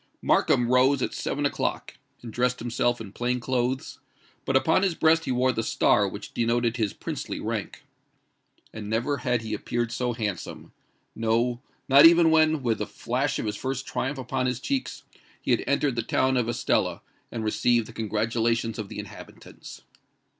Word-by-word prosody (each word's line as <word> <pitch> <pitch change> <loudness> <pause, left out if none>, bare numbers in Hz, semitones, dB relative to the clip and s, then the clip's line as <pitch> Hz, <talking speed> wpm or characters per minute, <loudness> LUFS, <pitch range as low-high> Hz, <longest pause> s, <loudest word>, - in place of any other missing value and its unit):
Markham 120 - +3
rose 130 +2 +3
at - - -2
seven 145 +1 -2
o'clock, 145 - -2 0.2
and 115 -2 -8
dressed 125 +1 +1
himself 120 +1 0
in 105 -4 -8
plain 125 +3 -1
clothes; 130 +1 -2 0.5
but 135 - 0
upon 160 +7 +3
his 190 -4 +1
breast 160 +1 +3
he - - -1
wore 130 +1 +2
the 115 - -2
star 110 - +2
which - - -8
denoted 120 0 0
his 110 -4 0
princely - - -5
rank. - - -4 0.9
And 105 -1 -7
never 120 +6 0
had 125 -3 -1
he 110 - -4
appeared 120 -1 -2
so 125 0 -1
handsome;—no—not 115 - 0
even 170 -1 +5
when, 155 -2 +3
with 115 -2 0
the - - -3
flash - - -2
of - - -3
his 105 -1 -2
first 135 +3 -4
triumph 135 +2 -3
upon 130 0 -2
his 125 -1 -2
cheeks, 265 - -3 0.4
he - - -2
had - - +2
entered 140 -4 +1
the 115 - 0
town 130 +3 +1
of 120 -2 +1
Estella 120 - 0 0.3
and 115 - -4
received 115 +1 +1
the 115 - -12
congratulations 115 +1 -1
of 105 -2 -5
the - - -8
inhabitants. - - -11
120 Hz, 170 wpm, -26 LUFS, 115-130 Hz, 0.9 s, even